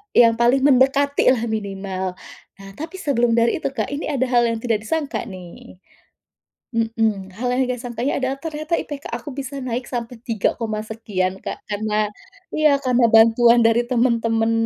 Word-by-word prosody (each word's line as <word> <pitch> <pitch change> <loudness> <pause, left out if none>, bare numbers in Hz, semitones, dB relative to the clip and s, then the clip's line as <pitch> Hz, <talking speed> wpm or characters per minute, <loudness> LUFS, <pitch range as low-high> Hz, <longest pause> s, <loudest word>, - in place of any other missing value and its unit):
E - - +8
yang 230 0 +3
paling 240 +3 +3
mendekatilah 270 -2 +3
minimal. 195 -3 -3 0.5
Nah, 195 0 -11
tapi 330 +5 -7
sebelum 240 -7 +1
dari 230 0 +2
itu, - - -1
Kak, 220 -6 -2
ini 290 - -3
ada 270 -3 0
hal 240 -1 +4
yang 230 -1 -2
tidak 225 -4 0
disangka 280 -5 -2
nih. 180 -2 -11 1.0
Mhm. 225 -4 -1
Hal 250 +1 -1
yang 260 - +2
enggak 250 -1 -3
sangkanya 245 +2 -2
adalah 260 +1 -1
ternyata 310 +1 -3
IPK 285 -1 -7
aku 295 - -6
bisa 275 0 -5
naik 245 0 -3
sampai 240 -1 -4
tiga 230 -5 0
koma 220 -2 -3
sekian, 195 -4 -3
Kak. - - -4
Karena 210 0 0 0.5
iya, 305 -2 +4
karena 250 -2 +2
bantuan 230 +2 +6
dari 230 +1 +3
teman-teman, 230 -2 +2
235 Hz, 165 wpm, -21 LUFS, 220-260 Hz, 1.0 s, E